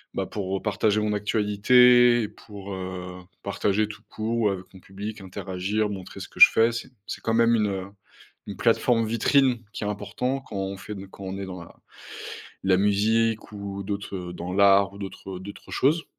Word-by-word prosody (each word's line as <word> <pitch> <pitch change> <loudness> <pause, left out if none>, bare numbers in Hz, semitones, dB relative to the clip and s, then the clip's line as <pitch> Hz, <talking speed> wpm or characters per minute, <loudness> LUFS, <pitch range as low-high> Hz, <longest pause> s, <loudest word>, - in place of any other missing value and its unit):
bah, - - -1
pour 95 -2 -3
partager 105 0 +1
mon 105 0 0
actualité, 115 +3 +4
pour, 100 -2 -10
heu, 90 -1 -6 0.2
partager 100 +1 0
tout 110 - -10
court, 110 +2 -2
ou 105 - +3
avec 95 -2 -4
mon 95 - -13
public, 100 +3 -7
interagir, 95 +3 -2
montrer 95 -3 -7
ce - - -8
que - - -14
je - - +11
fais, 115 +1 +3
c'est 115 - -5 0.2
c'est - - -6
quand 115 - -1
même 115 0 +4
une, 105 -2 +2
heu, 95 -2 -3 0.6
une - - -7
plateforme 115 -2 +2
vitrine 120 +2 +2
qui - - -5
est - - -2
important 105 +6 -2
quand 120 -6 -9
on 95 0 -3
fait 105 +2 -8
de 100 -1 -8
quand 95 0 -11
on 95 +1 -5
est 100 - -5
dans 90 -2 -7
la 85 - -14 0.9
la 95 -1 +4
musique 110 +3 +1
ou 100 -1 -6
d'autres, 100 0 -4
heu, 90 -1 -6
dans 90 +1 -6
l'art 100 0 +5
ou 100 - -12
d'autres, 95 -1 -7
heu, - - -8
d'autres 100 +2 -10
choses. 155 +5 +2
100 Hz, 195 wpm, -25 LUFS, 95-110 Hz, 0.9 s, je